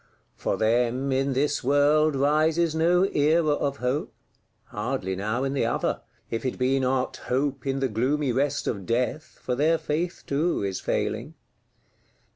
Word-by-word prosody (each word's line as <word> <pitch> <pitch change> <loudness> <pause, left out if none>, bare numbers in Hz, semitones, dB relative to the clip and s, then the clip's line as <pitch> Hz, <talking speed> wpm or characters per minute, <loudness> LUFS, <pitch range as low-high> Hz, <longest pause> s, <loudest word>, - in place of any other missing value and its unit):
For - - -2
them, 120 +4 +1
in 135 +1 +1
this 145 +2 0
world, 145 +3 +3
rises 155 +4 +2
no 170 +3 +3
Era 155 -1 +2
of 140 -1 -1
Hope; 125 +4 -2 0.5
hardly 105 -3 -3
now 110 +6 -2
in 135 0 -1
the 135 -5 +1
other,—if 115 -1 -3
it 130 - -2
be 130 +1 +2
not 130 0 0
hope 135 +2 -2
in 135 0 -1
the 135 - +2
gloomy 130 +5 0
rest 140 +4 0
of 100 -3 -3
Death, 125 +6 -2
for 125 - -1
their 155 +6 +2
faith 160 +3 -3
too 150 -2 0
is 95 -1 -2
failing. - - -2
135 Hz, 150 wpm, -26 LUFS, 125-150 Hz, 0.5 s, world